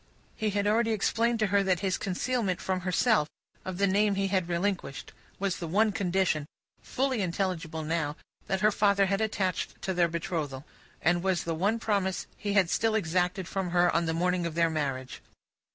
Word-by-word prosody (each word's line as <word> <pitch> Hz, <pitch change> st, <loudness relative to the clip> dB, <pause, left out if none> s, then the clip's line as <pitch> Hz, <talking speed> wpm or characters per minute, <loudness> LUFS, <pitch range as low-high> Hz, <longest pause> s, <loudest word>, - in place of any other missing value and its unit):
He 215 Hz, -2 st, -1 dB
had 200 Hz, 0 st, 0 dB
already 225 Hz, +2 st, +2 dB
explained 230 Hz, +3 st, +1 dB
to -, -, +4 dB
her 200 Hz, -, +5 dB
that 185 Hz, -3 st, +1 dB
his 190 Hz, -2 st, 0 dB
concealment 200 Hz, 0 st, -1 dB
from 185 Hz, -1 st, -1 dB
herself 185 Hz, -1 st, +2 dB, 0.4 s
of 185 Hz, -1 st, -5 dB
the 200 Hz, -, +3 dB
name 200 Hz, +1 st, +2 dB
he 195 Hz, 0 st, 0 dB
had 185 Hz, -3 st, 0 dB
relinquished, 175 Hz, -4 st, -2 dB, 0.2 s
was 195 Hz, -2 st, -1 dB
the 170 Hz, -, -5 dB
one 210 Hz, +6 st, +3 dB
condition 185 Hz, -6 st, 0 dB, 0.3 s
fully 260 Hz, -3 st, -1 dB
intelligible 170 Hz, -3 st, -2 dB
now 155 Hz, -2 st, -1 dB, 0.3 s
that 190 Hz, -1 st, -1 dB
her 215 Hz, 0 st, +5 dB
father 200 Hz, -1 st, +3 dB
had 195 Hz, +2 st, 0 dB
attached 195 Hz, -4 st, -1 dB
to 190 Hz, -, -1 dB
their 175 Hz, -1 st, +3 dB
betrothal, 160 Hz, -5 st, -3 dB, 0.4 s
and 175 Hz, +1 st, +3 dB
was 190 Hz, -1 st, 0 dB
the 165 Hz, -, -2 dB
one 200 Hz, +8 st, +1 dB
promise 200 Hz, -4 st, -1 dB
he 205 Hz, -1 st, -3 dB
had 190 Hz, -4 st, +3 dB
still 225 Hz, -1 st, +1 dB
exacted 180 Hz, -1 st, 0 dB
on 175 Hz, -2 st, +2 dB
the 160 Hz, -, 0 dB
morning 180 Hz, 0 st, +1 dB
of 160 Hz, -, -6 dB
their 165 Hz, -1 st, +3 dB
marriage. 135 Hz, -4 st, -3 dB
185 Hz, 180 wpm, -29 LUFS, 170-205 Hz, 0.4 s, her